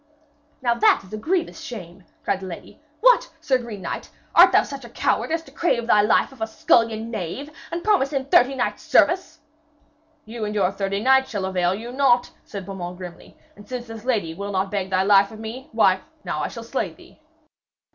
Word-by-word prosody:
'Now 240 -1 +3
that 235 - +3
is 190 - -15
a - - -3
grievous 335 - -1
shame!' 190 - -9 0.2
cried 195 - 0
the 190 - -7
lady, 180 - -10 0.2
'What, - - +5
Sir 275 -5 +1
Green 220 -6 -8
Knight, - - -5 0.2
art - - +8
such 275 -2 -8
a 235 - -10
coward - - 0
as 325 0 -1
to - - -16
crave 240 -9 0
thy 210 -3 +5
life 210 +6 +2
of 265 -4 -16
a 220 - 0
scullion 225 0 +1
knave, 225 - -5 0.2
and 340 +1 -3
promise 390 -10 +2
him 270 -2 -1
thirty 270 0 +4
knights' 245 - -2
service!' 335 -3 +2 0.8
'You 225 0 -6
and 210 0 -3
your 195 -2 +2
thirty 195 0 -2
knights 265 +2 +4
shall 200 -3 -3
avail 185 -1 +1
you 230 +4 -7
naught,' 250 -2 +3
said 200 -3 -8
Beaumains 180 -2 -6
grimly, 180 -2 -11 0.2
'and 205 0 -15
since 250 -1 -5
this 225 -2 -9
lady 215 -10 0
will 200 +4 -5
not 190 0 -1
beg 195 -2 -2
thy 190 0 +2
life 200 0 +5
of 220 - -11
me, 225 +4 -7
why, 190 -4 +4 0.2
now - - -3
I - - -1
shall - - -8
slay - - -2
thee.' - - -19
225 Hz, 205 wpm, -23 LUFS, 195-265 Hz, 0.8 s, art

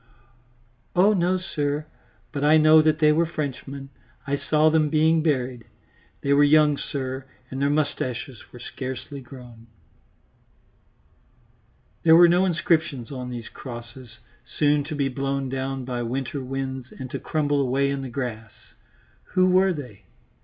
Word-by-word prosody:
"Oh 195 +4 +5
no, 185 -1 +1
sir, 150 -5 -3 0.5
but 140 - -3
I 150 +2 +6
know 155 0 +7
that 155 0 +2
they 155 -1 +4
were 165 +2 +2
Frenchmen; 140 -3 -5 0.4
I 140 0 0
saw 150 +2 +2
them 155 -1 +2
being 160 +1 +3
buried. 130 -6 -1 0.6
They 140 - +2
were 145 +1 +5
young, 150 0 +5
sir, 130 -2 -5 0.2
and 130 +1 -4
their 140 - +2
moustaches 135 -5 -3
were - - -11
scarcely 130 +3 -7
grown." 120 -3 -13 2.3
There 160 -1 +6
was 170 0 +7
no 180 +2 +3
inscription 165 -6 0
on 125 -2 -6
these 120 -2 -6
crosses, 120 -1 -10 0.3
soon 145 -1 +1
to 155 +1 -5
be 140 -2 0
blown 135 0 -2
down 135 0 -3
by 125 -1 -3
winter 130 +3 -3
winds 130 -1 -4
and 130 -1 -7
to - - -4
crumble 145 -2 0
away 140 +1 +1
in 140 -1 -3
the 135 - -6
grass. 120 -4 -5 0.8
Who 185 0 +5
were 190 +1 +4
they? 125 - -8
140 Hz, 145 wpm, -24 LUFS, 130-155 Hz, 2.3 s, know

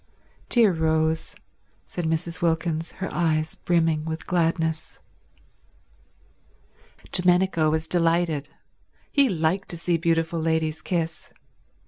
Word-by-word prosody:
"Dear 225 -6 +5
Rose," 160 0 0 0.5
said 175 - -5
Mrs. 165 +2 -2
Wilkins, 165 -1 -1
her 190 - -5
eyes 155 -2 0
brimming 165 -3 +1
with 160 0 -5
gladness. 165 -2 -1 2.1
Domenico 180 -3 +3
was 160 +1 -1
delighted. 165 -4 +1 0.6
He 280 -3 +4
liked 175 +2 0
to 170 - -4
see 170 +1 0
beautiful 165 0 0
ladies 160 -1 0
kiss. 165 -3 -3
165 Hz, 100 wpm, -24 LUFS, 160-175 Hz, 2.1 s, Dear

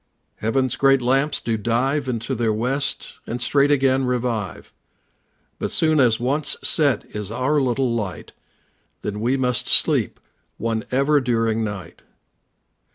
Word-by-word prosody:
Heaven's 130 +3 -1
great 135 0 +4
lamps 135 +4 +1
do 115 -1 -2
dive 130 +6 -1
Into 115 +2 -3
their 115 -2 0
west, 125 +6 -2
and 120 - -4
straight 140 +3 +2
again 135 -2 +2
revive, 120 - -3 0.9
But - - -2
soon 155 -1 +2
as 120 -4 +3
once 140 +5 -1
set 140 -9 +2
is 105 -2 -4
our 130 +6 0
little 125 -1 0
light, 105 -6 -5 0.7
Then 105 0 -4 0.2
must 125 -2 0
we - - -4
sleep - - +4 0.4
one 115 0 -2
ever 140 +3 +2
during 115 -2 0
night. 100 -5 -7
125 Hz, 135 wpm, -22 LUFS, 115-135 Hz, 0.9 s, great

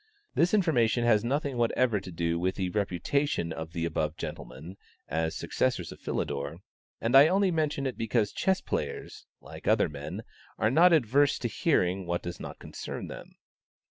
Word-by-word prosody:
This 175 +5 +3
information 120 - +2
has 110 -2 +4
nothing 140 +1 -1
whatever 120 -1 +2
to 95 -1 -9
do 85 0 -1
with 95 +2 0
the 95 -2 -1
reputation 100 - 0
of 80 0 -6
the 85 -1 -2
above 80 -1 -2
gentlemen, 80 +10 -7 0.3
as 80 0 -1
successors 110 -10 -1
of - - -11
Philidor, 70 +3 -3 0.4
and 115 +3 +1
I 140 +3 +9
only 190 +2 +3
mention 150 -4 0
it 130 - -3
because 115 -2 +1
chess 190 -1 +1
players, - - -4
like - - -11
other - - +4
men, 70 -1 -6 0.3
are 110 - +2
not 175 +6 +6
adverse 140 -1 +3
to 120 - -2
hearing 95 - +1
what 85 0 -1
does 85 0 -6
not - - -7
concern - - -7
them. - - -10
110 Hz, 170 wpm, -29 LUFS, 85-140 Hz, 0.4 s, I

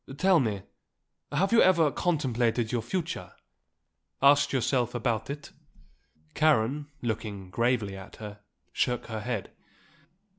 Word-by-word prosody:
Tell 185 +1 +4
me; 105 -6 -1 0.7
have 195 +3 +1
you 230 - +6
ever 165 -5 +5
contemplated 125 -9 0
your 120 -2 0
future? 170 +7 -4 0.9
asked 140 +1 +5
yourself 125 -2 0
about 115 -1 -1
it?" 145 +1 -6 0.8
Karen, 145 - +2 0.2
looking 105 -5 -4
gravely 115 -4 0
at 95 +1 -10
her, 105 -1 -9 0.3
shook 125 -1 0
her 110 -1 -3
head. 115 -1 -4
120 Hz, 115 wpm, -28 LUFS, 110-145 Hz, 0.9 s, you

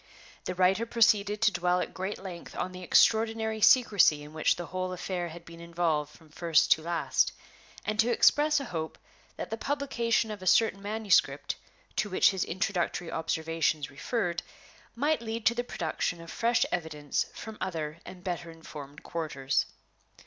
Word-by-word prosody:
The 185 - -3
writer 190 +5 +3
proceeded 210 -2 +3
to 215 - +5
dwell 180 -1 +1
at - - -3
great 190 +3 -4
length 180 -3 -9
on 185 - -3
the 185 0 -9
extraordinary 220 +3 +3
secrecy 205 - +5
in 150 +1 -12
which 155 - +2
the 175 - -6
whole 185 +1 -3
affair 180 -1 -3
had 170 +1 -11
been 165 0 -12
involved 165 -3 -1
from 155 +1 -19
first 165 0 +2
to 160 - +5
last, 170 +1 +1 0.5
and 215 0 -2
to 230 - +4
express 295 +5 +4
a 275 - -5
hope 160 -7 -5 0.4
that - - -6
the 225 - -2
publication 250 -6 0
of 210 -2 -7
a 185 - -6
certain 205 0 +4
manuscript, 210 0 +1 0.4
to 210 - +1
which 185 - +4
his 190 -2 -1
introductory 175 -2 -2
observations 160 -2 -1
referred, 175 - -2 0.5
might 295 +4 +1
lead 225 -1 -4
to 235 - +5
the 240 +1 -2
production 170 -4 -3
of 165 0 -10
fresh 235 0 +2
evidence 155 -4 -2
from 220 -1 -8
other 160 -4 -3
and 180 -1 -11
better 175 -2 -4
informed 150 -2 -10
quarters. 140 -5 -1
180 Hz, 165 wpm, -29 LUFS, 165-220 Hz, 0.5 s, to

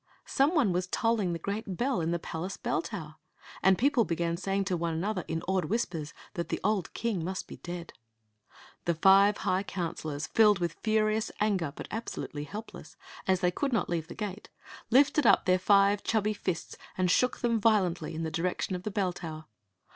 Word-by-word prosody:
Some 285 +6 +2
one 240 - +3
was 180 +1 -1
tolling 220 -2 +1
the 170 - -2
gresrt 200 +3 -4
bdl 245 -1 0
in 160 - -1
die 170 - +1
psOace 170 +3 -5
bell - - 0
tower, 165 -3 -7 0.4
and 190 0 +5
people 275 -2 +3
began 170 -2 -1
saying 195 +2 -1
to 190 -2 0
one 170 -1 -1
another 185 +2 -1
in 165 +1 -3
awed 190 -1 +1
whispers 175 -9 -2 0.2
that 170 - -4
the - - -1
old 205 -5 0
king 220 -8 -1
must 190 +3 -4
be - - -9
dead. 175 -1 -7 0.9
The 170 - +1
five 195 +4 +6
high 185 +1 +2
counselors, 160 -6 -4
filled 210 0 +5
with 170 -2 -2
furious 215 0 +1
an^ 210 -2 +2 0.2
but - - -7
absolutely 155 -9 -5
helpless, 210 +7 -9 0.3
as 190 -1 +2
they 180 -1 +2
amid 275 -3 +1
not 225 - +1
leave 165 -2 -2
the - - -9
gate, 210 -1 -5 0.4
lifted 275 +1 +4
up, - - +5
their 185 0 +3
five 200 +1 +4
chubby 215 -1 +1
fists 185 -5 -4 0.2
and 180 -2 +2
shook 250 +5 +2
them 230 -2 +1
violently 190 -7 +2
in 165 - -3
the 160 - -3
direction 180 +3 -1
of 180 - -5
the 215 - -3
bell 195 -3 0
tower. 155 -3 -7
190 Hz, 190 wpm, -29 LUFS, 170-215 Hz, 0.9 s, five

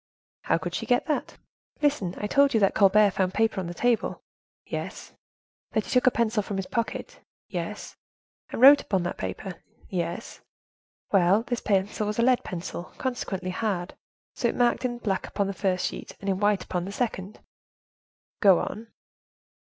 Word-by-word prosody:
"How - - +3
could - - -5
she - - -3
get 245 -1 +2
that?" 305 -3 -2 0.5
"Listen; 245 -12 +1
I - - -3
told 280 +3 +3
you - - +5
that 195 - +4
Colbert 205 0 +5
found 185 -1 -1
paper 220 -2 +2
on 180 - -5
the 175 - -5
table." 240 0 0 0.4
"Yes." - - -6 0.6
"That 220 -3 +1
he - - -7
took 250 0 +3
a - - +10
pencil 230 -3 +1
from 200 -1 -5
his 195 - -2
pocket." 230 +3 -3 0.3
"Yes." - - -5 0.5
"And - - -5
wrote 280 +3 +9
upon 190 -3 -1
that 175 - -4
paper." 190 -4 -5 0.3
"Yes." 175 -2 -4 0.7
"Well, 195 +2 +4
this 245 -2 -3
pencil 205 +1 0
was 210 - -2
a 235 - +3
lead 255 0 +3
pencil, 175 0 -5
consequently 195 -8 -3
hard; 190 -3 -2 0.4
so, 240 - 0
it - - -1
marked 245 +1 +2
in 240 -1 -1
black 200 -5 -2
upon 200 - -1
the 195 - -3
first 185 -1 0
sheet, - - -5
and 200 - -8
in 190 -1 0
white 205 -2 +2
upon 180 -1 -3
the 195 - -5
second." 205 -3 -3 1.0
"Go 195 -4 +6
on." 225 +6 -4
205 Hz, 175 wpm, -26 LUFS, 190-235 Hz, 1.0 s, a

